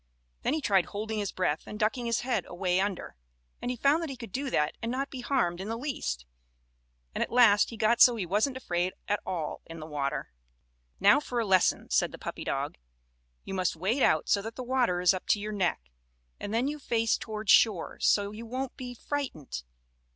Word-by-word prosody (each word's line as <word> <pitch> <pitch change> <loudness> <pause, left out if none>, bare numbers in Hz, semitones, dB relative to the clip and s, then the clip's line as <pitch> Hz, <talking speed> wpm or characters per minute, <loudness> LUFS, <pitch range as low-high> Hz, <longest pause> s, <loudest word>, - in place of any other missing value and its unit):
Then 295 - +1
he 315 - -2
tried 195 - +3
holding 215 +3 -4
his 200 -2 -2
breath 180 -5 -1
and 210 - -6
ducking 235 +3 0
his 230 - +1
head 240 -7 -1
away 180 0 0
under, 195 -2 -3 0.5
and - - -3
he 250 - -2
found 280 +7 +3
that 330 - -3
he 270 - -5
could 230 -5 -9
do 275 +4 -2
that 150 -9 +1
and 230 - -2
not 270 +2 -2
be 260 - -6
harmed 185 -10 0
in 200 - -5
the 225 - -2
least, 70 - -3 0.9
and - - 0
at - - -6
last 230 -4 +6
he 230 - -8
got 230 +3 +2
so 245 - +8
he 205 -5 -2
wasn't 215 +9 +1
afraid 180 -6 -1
at 205 0 +1
all 170 -5 -3
in 165 0 -8
the 155 - -7
water. 145 -2 -3 0.7
"Now 205 +7 +6
for 250 -5 -3
a 230 - 0
lesson," 190 -2 +2
said - - +2
the - - -9
puppy - - -6
dog. - - -3 0.6
"You - - -6
must 185 -3 0
wade 200 - 0
out 155 - +3
so 200 - +3
that 225 +2 -7
the 255 - -5
water 245 -8 +1
is 180 +1 +5
up 185 - -6
to 210 - +3
your 210 +1 -4
neck, 190 -4 0 0.6
and 205 - -5
then 235 +4 +1
you 300 +1 -3
face 230 -4 +1
toward 215 -1 -2
shore, 210 -7 +4
so 205 -1 +2
you 225 +2 -8
won't 260 +2 -4
be 250 -2 -7
frightened. 230 - -4
215 Hz, 215 wpm, -29 LUFS, 185-245 Hz, 0.9 s, so